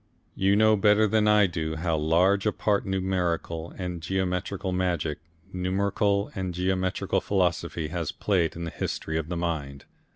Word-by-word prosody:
You 95 +1 +2
know 110 +1 +5
better 105 +1 +4
than 105 0 +2
I 105 -1 +6
do 80 -3 -3
how 80 0 -1
large 90 +7 +2
a - - +3
part 105 -2 0
numerical 90 -3 -1
and 90 -2 -4
geometrical 95 +1 -2
magic, 85 -5 -1 0.3
numerical 100 +2 0
and 95 -2 -4
geometrical 95 0 0
philosophy 85 -4 -1
has 85 -2 -3
played 90 -6 0
in 85 - -5
the 85 - -4
history 80 0 -3
of 80 0 -5
the 90 - -2
mind. 75 -5 -3
90 Hz, 155 wpm, -26 LUFS, 85-100 Hz, 0.3 s, I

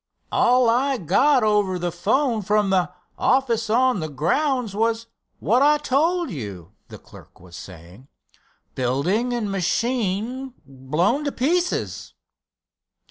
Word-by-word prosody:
"All 250 0 +3
I 260 +4 +2
got 260 - +2
over 205 -3 +1
the 175 0 -3
'phone 225 - 0
from 205 0 +1
the 180 -2 +1 0.3
office 235 -4 +1
on 250 -1 +2
the 155 -1 -4
grounds 220 - -1
was 225 +1 0 0.3
what 240 +5 +1
I 300 +1 +5
told 320 +5 0
you," 100 - -8 0.2
the - - -11
clerk - - -17
was 90 -1 -14
saying—"building 130 - -5
and 230 -4 -2
machine 230 +6 -2
blown 145 - -1
to 285 - -1
pieces." 345 +8 -2
220 Hz, 120 wpm, -22 LUFS, 175-260 Hz, 0.3 s, I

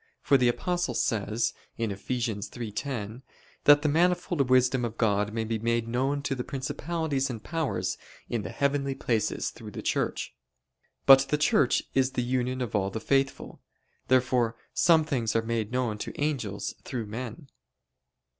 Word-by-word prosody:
For 140 - +4
the 125 -2 +4
Apostle 175 +8 0
says 115 0 0 0.2
(Eph. 105 -4 -4
3:10): 115 0 -3 0.4
"That 145 0 +7
the - - +2
manifold 170 -2 +2
wisdom 130 0 +4
of 115 -1 -3
God 105 -2 +1
may 115 +1 -2
be 110 0 -2
made 115 +1 0
known 135 +4 0
to 145 - -1
the 125 -2 -3
principalities 140 +1 -2
and 115 -4 -6
powers 165 -3 -2 0.3
in 115 - -2
the 85 - -6
heavenly 140 +1 0
places 110 -5 -1
through - - -10
the - - -7
Church." - - -1 0.7
But 135 0 +8
the 150 - +2
Church 145 -3 +3
is 135 0 +2
the 125 - 0
union 130 +1 -1
of 115 -3 -3
all 95 -1 +1
the 110 - -4
faithful. 135 +3 -1 0.5
Therefore 125 -3 +2 0.2
some 165 -2 +5
things 120 -8 -1
are 115 - +2
made 115 -1 -2
known 120 -4 -1
to - - -6
angels 120 -10 -2
through 120 -4 -4
men. 120 +5 -7
125 Hz, 155 wpm, -28 LUFS, 115-140 Hz, 0.7 s, But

